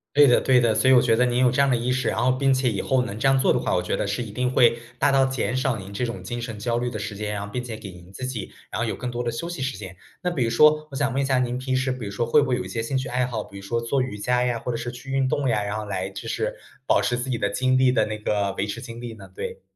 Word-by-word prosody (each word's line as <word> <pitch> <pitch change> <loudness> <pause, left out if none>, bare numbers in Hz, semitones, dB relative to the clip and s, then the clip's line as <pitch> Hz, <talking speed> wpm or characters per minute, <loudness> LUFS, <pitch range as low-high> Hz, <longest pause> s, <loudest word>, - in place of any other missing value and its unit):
对 145 0 +8
的 125 - +5
对 130 -2 +4
的， 115 -2 +2
所 130 - +3
以 - - +8
我 125 - +7
觉 115 -2 +3
得 125 +2 +3
您 125 0 +1
有 125 -1 +5
这 130 - -1
样 140 - +5
的 - - +4
意 120 +2 -1
识， 130 +1 0
然 - - 0
后 130 - +4
并 135 +1 +2
且 130 -1 +2
以 100 - -2
后 130 -1 +2
能 110 -4 -6
这 135 - +1
样 135 0 +4
做 130 - +3
的 - - +3
话， - - -1
我 90 - +2
觉 90 - -2
得 - - -1
是 100 +4 -2
一 115 - -5
定 125 +3 -1
会 120 -2 +5 0.2
大 145 - +4
大 135 -1 +4
减 130 -1 -1
少 130 -1 +1
您 100 -1 -8
这 110 +5 -2
种 115 -6 -5
精 120 +5 -4
神 115 -3 -6
焦 120 +2 0
虑 125 +1 -1
的 110 - -5
时 105 0 -5
间 105 0 -3
啊， 100 - -5
并 125 +4 -4
且 120 -3 -6
给 110 -2 -9
您 90 +1 -15
自 130 - -8
己 115 -6 -5 0.2
然 - - -4
后 - - 0
有 - - -2
更 125 - -4
多 120 0 -3
的 120 - -1
休 170 +9 -4
息 175 - -6
时 135 0 -2
间。 95 -2 -9 0.2
那 180 - 0
比 135 -8 0
如 115 - 0
说 150 +2 +5
我 - - -7
想 140 -1 0
问 135 - 0
一 - - 0
下， 130 -1 +2
您 125 0 -1
平 130 0 -2
时 130 0 +1
比 125 -4 -5
如 100 - -5
说 115 +3 -1
会 145 +4 +5
不 - - -2
会 125 - +2
有 - - -3
一 95 - -7
些 105 +4 -4
兴 135 +4 -3
趣 130 - -1
爱 125 0 +1
好， 115 -4 -3
比 100 - -12
如 100 - -9
说 115 +4 -1
做 130 +3 0
瑜 130 -5 -5
伽 125 +3 +1
呀， 120 -2 0
或 125 - -6
者 115 - -2
是 120 +1 -4
去 125 +3 -11
运 135 -1 +2
动 135 0 0
呀， 105 -2 +1
然 100 +1 -3
后 110 - -3
来 95 -2 -3
就 95 - -7
是 - - -2 0.3
保 - - +3
持 120 0 0
自 125 - -4
己 115 - -1
的 - - +1
精 130 0 +1
力 130 -1 +4
的 125 - +2
那 110 - -4
个 100 -2 0
维 100 - -2
持 120 - -4
精 115 -1 -8
力 120 -2 -6
呢？ 100 -3 -12
对。 - - -6
120 Hz, 385 characters per minute, -24 LUFS, 110-130 Hz, 0.3 s, 对